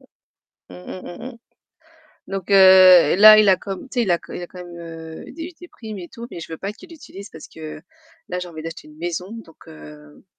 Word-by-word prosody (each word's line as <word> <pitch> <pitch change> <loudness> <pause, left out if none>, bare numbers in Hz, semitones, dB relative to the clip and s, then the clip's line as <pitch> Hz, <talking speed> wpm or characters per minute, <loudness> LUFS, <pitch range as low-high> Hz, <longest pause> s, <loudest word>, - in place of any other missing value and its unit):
Mmh, - - -23 0.8
mmh, 185 - -9
mmh, 175 - -10
mmh. 250 -2 -11 0.9
Donc 195 -1 -6
heu, 185 -4 +7
là, 215 +2 +9
il 215 -2 +4
a 190 - +5
comme 195 0 -7
tu 250 - -2
sais, - - +3
il 200 - -1
a 170 - +3
co - - -14
il 175 - -6
a - - -6
quand 185 - -13
même, 175 -1 -12
heu, 165 -1 -10
eu - - -11
des 335 +2 -8
des 355 - -12
primes 215 -3 -10
et 175 - -10
tout, 235 0 -10
mais 170 - -8
je 165 - -9
veux 160 - -5
pas 200 +1 -5
qu'il 355 +11 -17
l'utilise 200 - -12
parce 160 - -12
que 155 -1 -10 0.5
là 180 - -4
j'ai 180 - -7
envie 160 -2 -9
d'acheter 165 -1 -9
une 150 - -17
maison, 175 +2 -5
donc 225 -8 -12
heu 150 -1 -15
180 Hz, 245 wpm, -21 LUFS, 165-210 Hz, 0.9 s, là